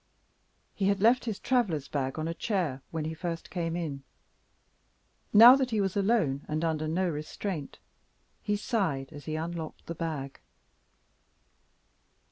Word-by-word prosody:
He 195 - 0
had 200 0 +2
left 235 +5 +4
his 220 -4 -2
travelers' 210 - 0
bag 135 -1 -2
on 155 0 -2
a 165 - -2
chair, 170 - -1
when 160 -2 -3
he 160 - -3
first 165 0 -5
came 170 -2 -2
in. 155 -6 -4 1.3
Now 235 +4 +10
that 265 -2 0
he 220 -3 0
was 195 -1 0
alone, 195 - +1
and 155 +2 -1
under 155 -1 -1
no 180 +4 0
restraint, 155 0 -4 0.6
he 210 - 0
sighed 185 - -1
as 145 -1 -10
he 155 - -3
unlocked 165 0 -5
the 170 - -4
bag. 155 -5 -5
165 Hz, 145 wpm, -29 LUFS, 155-200 Hz, 1.3 s, Now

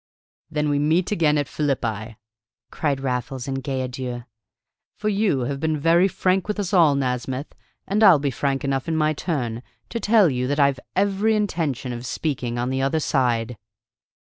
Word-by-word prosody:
"Then 150 -1 -1
we 145 0 +1
meet 160 +6 +1
again 155 -6 +2
at 145 -2 0
Philippi," 115 -7 -2 0.5
cried 140 -4 -1
Raffles 130 0 -3
in 135 0 -3
gay 130 0 -2
adieu. 125 -1 -5 0.7
"For 215 - -2
you 200 -9 +1
have 135 +3 -3
been 155 +1 0
very 170 +5 +4
frank 185 0 0
with 210 0 -2
us 205 0 -3
all, 165 -6 +5
Nasmyth, 130 +1 -2 0.3
and 205 +2 0
I'll 190 -6 +8
be 140 -1 -1
frank 135 +2 -1
enough 135 0 -1
in 160 -1 0
my 155 0 +2
turn 125 -8 -3 0.3
to 230 - -3
tell 215 -3 +4
you 125 -3 -1
that 145 +2 -1
I've 140 -2 +3 0.2
every 200 +3 +2
intention 160 - -1
of 120 +1 -6
speaking 125 -5 -2
on 120 +2 -1
the 130 0 -1
other 135 +4 +1
side!" 120 -5 0
140 Hz, 175 wpm, -23 LUFS, 130-170 Hz, 0.7 s, I'll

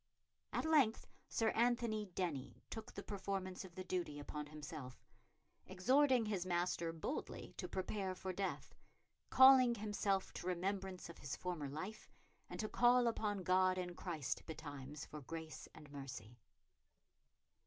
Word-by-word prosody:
At - - 0
length 285 -8 +4 0.2
Sir 225 -1 +2
Anthony 235 -2 +2
Denny 150 -8 -3
took 225 +1 -6
the - - -7
performance 195 -2 -3
of 180 -2 -11
the 185 - -4
duty 175 -5 -2
upon 150 +1 -5
himself, 150 -3 -8 0.6
exhorting 255 +6 +4
his 200 -4 0
master 175 -2 0
boldly 165 - -4
to - - -3
prepare 190 0 -2
for 185 0 -4
death, 180 -6 -3 0.6
"calling 260 -2 +8
himself 205 -2 0
to - - -5
remembrance 190 +1 -2
of 170 - -11
his 145 - -4
former 170 -6 -3
life, 185 +10 -6 0.4
and - - -6
to 215 - -1
call 245 +2 +5
upon 210 -4 0
God 185 +1 +4
in 180 -1 -3
Christ 165 -6 -3
betimes 145 -2 -6
for 150 - -8
grace 160 +3 -7
and 150 -2 -12
mercy." 125 -5 -8
185 Hz, 140 wpm, -39 LUFS, 155-215 Hz, 0.6 s, calling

